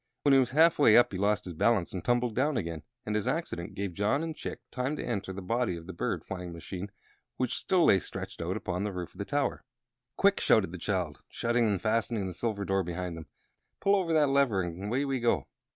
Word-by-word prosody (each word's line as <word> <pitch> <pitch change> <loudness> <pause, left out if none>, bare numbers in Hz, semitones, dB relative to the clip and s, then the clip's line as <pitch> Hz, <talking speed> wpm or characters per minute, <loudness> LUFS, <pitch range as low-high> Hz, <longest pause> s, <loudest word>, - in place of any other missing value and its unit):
When 140 - +5
he 135 - +7
was 130 -2 +2
half 160 +4 +4
way 110 -7 +7
up 120 - +5
he 95 - -4
lost 105 +1 +1
his 90 - -6
balance 100 +2 +2
and 95 - -4
tumbled 120 -1 +1
down 135 +4 +1
again, 85 -4 -3 0.2
and 105 - -2
this 105 - 0
accident 160 - -3
gave 100 -2 -3
John 105 - +1
and 165 -1 -4
Chick - - -6
time 130 +3 -1
to - - -5
enter 100 -5 -3
the 95 0 -6
body 115 -2 0
of 85 - -10
the 95 - -7
bird - - -2
flying 90 -2 -6
machine, 90 +4 -6 0.5
which 125 -2 -1
still 180 -3 +2
lay 95 - +6
stretched - - -7
upon 90 +1 -2
the 105 - -2
roof 90 -2 -6
of - - -17
the 100 - -2
tower. 145 0 -1 0.5
"Quick!" 200 0 +4
shouted 95 -6 +3
the 90 - -7
child, 90 -6 -2
shutting 120 0 +1
and 100 -3 +1
fastening 110 0 0
the 95 - -4
silver 100 +1 -2
door 95 0 +1
behind 90 0 -4
them. 80 -1 -9 0.5
"Pull 200 0 +3
over 185 -4 0
that 150 -3 +4
lever, 135 -9 +3
and 90 +3 -5
away 125 +7 0
we 135 -2 -1
go!" 110 - +1
105 Hz, 230 wpm, -29 LUFS, 90-130 Hz, 0.5 s, he